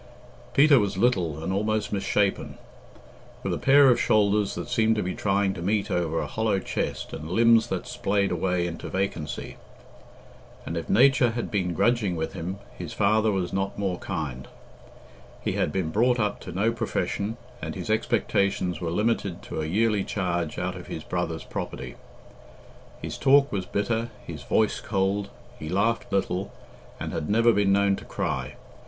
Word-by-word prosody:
Peter 140 Hz, -1 st, +7 dB
was 100 Hz, -3 st, -1 dB
little 90 Hz, -, +1 dB
and 95 Hz, -, -1 dB
almost 105 Hz, +1 st, 0 dB
misshapen, 100 Hz, 0 st, 0 dB, 0.9 s
with -, -, -1 dB
a -, -, -1 dB
pair 140 Hz, +1 st, +6 dB
of 125 Hz, -, +4 dB
shoulders 105 Hz, -1 st, +2 dB
that -, -, -5 dB
seemed 110 Hz, -2 st, +2 dB
to 105 Hz, -, 0 dB
be 90 Hz, -, -2 dB
trying 100 Hz, -1 st, +1 dB
to 95 Hz, -, -7 dB
meet 100 Hz, +3 st, 0 dB
over 85 Hz, -2 st, 0 dB
a -, -, -2 dB
hollow 110 Hz, -2 st, 0 dB
chest 95 Hz, -, -3 dB
and 75 Hz, -, -6 dB
limbs 115 Hz, +3 st, +5 dB
that -, -, -3 dB
splayed 105 Hz, -5 st, 0 dB
away 90 Hz, -2 st, 0 dB
into 85 Hz, -1 st, -5 dB
vacancy. 85 Hz, -7 st, -3 dB, 1.1 s
And -, -, -4 dB
if -, -, -4 dB
Nature 130 Hz, -3 st, +5 dB
had 115 Hz, +1 st, -4 dB
been 90 Hz, -4 st, 0 dB
grudging 110 Hz, -3 st, +2 dB
with 80 Hz, -1 st, -3 dB
him, 90 Hz, +4 st, -4 dB, 0.2 s
his -, -, -7 dB
father 110 Hz, +2 st, +3 dB
was 95 Hz, -2 st, -2 dB
not 95 Hz, 0 st, -2 dB
more 95 Hz, -3 st, -1 dB
kind. 75 Hz, -9 st, -4 dB, 0.9 s
He -, -, -2 dB
had -, -, 0 dB
been 90 Hz, -3 st, -1 dB
brought 120 Hz, +4 st, +3 dB
up 105 Hz, -2 st, 0 dB
to -, -, -8 dB
no 100 Hz, +6 st, +1 dB
profession, 110 Hz, -1 st, -2 dB, 0.2 s
and -, -, -5 dB
his -, -, -4 dB
expectations 90 Hz, -4 st, 0 dB
were 85 Hz, -, -2 dB
limited 100 Hz, -1 st, -1 dB
to -, -, -4 dB
a 75 Hz, -, -3 dB
yearly 105 Hz, +3 st, +2 dB
charge 85 Hz, -6 st, -2 dB
out 90 Hz, +1 st, -2 dB
of 90 Hz, -, -9 dB
his 80 Hz, -, -6 dB
brother's 85 Hz, -2 st, -3 dB
property. -, -, -6 dB, 1.1 s
His -, -, -5 dB
talk 140 Hz, +1 st, +5 dB
was 95 Hz, -3 st, -3 dB
bitter, 115 Hz, +3 st, -1 dB, 0.2 s
his 75 Hz, -4 st, -7 dB
voice 105 Hz, -, +1 dB
cold, 100 Hz, 0 st, 0 dB, 0.3 s
he 75 Hz, -, -6 dB
laughed 105 Hz, +6 st, 0 dB
little, 95 Hz, 0 st, -1 dB, 0.5 s
and -, -, -4 dB
had 75 Hz, -, -3 dB
never 115 Hz, +2 st, +4 dB
been 100 Hz, -1 st, +2 dB
known 100 Hz, 0 st, +3 dB
to -, -, -9 dB
cry. -, -, -3 dB
100 Hz, 170 wpm, -26 LUFS, 90-110 Hz, 1.1 s, Peter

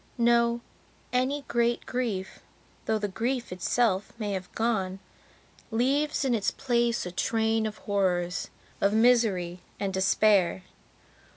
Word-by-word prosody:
No, 235 Hz, 0 st, +3 dB, 0.5 s
any 270 Hz, +3 st, 0 dB
great 235 Hz, 0 st, +1 dB
grief, 225 Hz, -7 st, -3 dB, 0.5 s
though 220 Hz, -, +2 dB
the 210 Hz, -1 st, -2 dB
grief 240 Hz, +4 st, -2 dB
itself 190 Hz, +2 st, 0 dB
may 210 Hz, -2 st, -3 dB
have 190 Hz, -2 st, -4 dB
gone, 195 Hz, -5 st, 0 dB, 0.7 s
leaves 275 Hz, +6 st, +1 dB
in 260 Hz, -, +2 dB
its 210 Hz, -4 st, +1 dB
place 240 Hz, -4 st, 0 dB
a 180 Hz, -, -5 dB
train 220 Hz, +3 st, +1 dB
of 215 Hz, 0 st, -7 dB
horrors, 180 Hz, -3 st, -1 dB, 0.3 s
of 200 Hz, +1 st, +3 dB
misery, 215 Hz, -7 st, +3 dB, 0.2 s
and 195 Hz, -1 st, -2 dB
despair. 190 Hz, -1 st, +3 dB
220 Hz, 120 wpm, -28 LUFS, 190-240 Hz, 0.7 s, No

